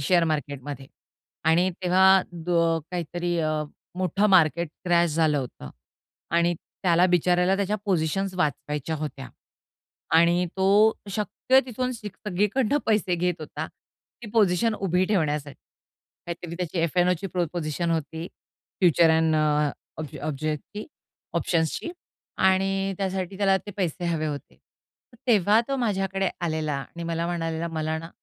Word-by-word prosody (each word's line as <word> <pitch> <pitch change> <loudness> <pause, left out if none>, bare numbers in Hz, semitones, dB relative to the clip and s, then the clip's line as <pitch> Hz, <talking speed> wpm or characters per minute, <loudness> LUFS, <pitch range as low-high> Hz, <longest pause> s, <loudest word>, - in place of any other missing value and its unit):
Share 170 +4 +3
मार्केटमध्ये 145 -3 -4 0.6
आणि 170 +4 +4
तेव्हा 185 +1 +4
अ, 170 -2 0
काहीतरी 175 0 -2
अं, 155 -1 0 0.3
मोठं 185 +3 +2
मार्केट 170 -2 +4 0.2
क्रॅश 175 -2 +3
झालं 155 -2 +2
होतं 120 - -7 0.7
आणि 170 +1 +3
त्याला 175 +1 +1
बिचाऱ्याला 180 +1 +3
त्याच्या 200 +1 0
पोझिशन्स 190 +1 0
वाचवायच्या 150 -1 -1
होत्या 140 -3 -6 0.9
आणि 170 +2 +4
तो 200 +3 +5 0.2
शक्य 220 +6 +2
तिथून 255 +1 -2
सिक 210 -5 -8
सगळीकडनं 210 +8 +1
पैसे 210 -5 +2
घेत 175 +1 0
होता 155 - -5
ती 240 - -18
पोझिशन 215 +1 +3
उभी 185 -2 +1
ठेवण्यासाठी, 150 -8 -1 0.7
काहीतरी 170 0 -6
त्याची 180 -1 -3
एफ-एन-ओची 180 +2 +1
पो 180 -1 -1
पोझिशन 170 0 -2
होती, 160 +1 -2 0.5
फ्युचर 170 -2 +5
ॲन 160 0 +3
अ, 150 -1 +2 0.3
ऑब्ज 155 -3 -6
ऑब्जेक्टसची 155 +7 -4 0.5
ऑप्शन्सची 165 - 0 0.5
आणि 195 +1 +2
त्यासाठी 190 -1 -2
त्याला 195 -1 +4
ते 205 - -10
पैसे 180 -2 -2
हवे 165 -2 0
होते. 145 -2 -6
तर 240 - -29
तेव्हा 215 -1 +4
तो 275 - 0
माझ्याकडे 195 -5 0
आलेला 155 -3 -1
आणि 155 +5 -7
मला 165 0 -2
म्हणालेला, 165 -1 -2
"मला 160 -1 -2
ना" 165 - -8
175 Hz, 130 wpm, -25 LUFS, 160-190 Hz, 0.9 s, तो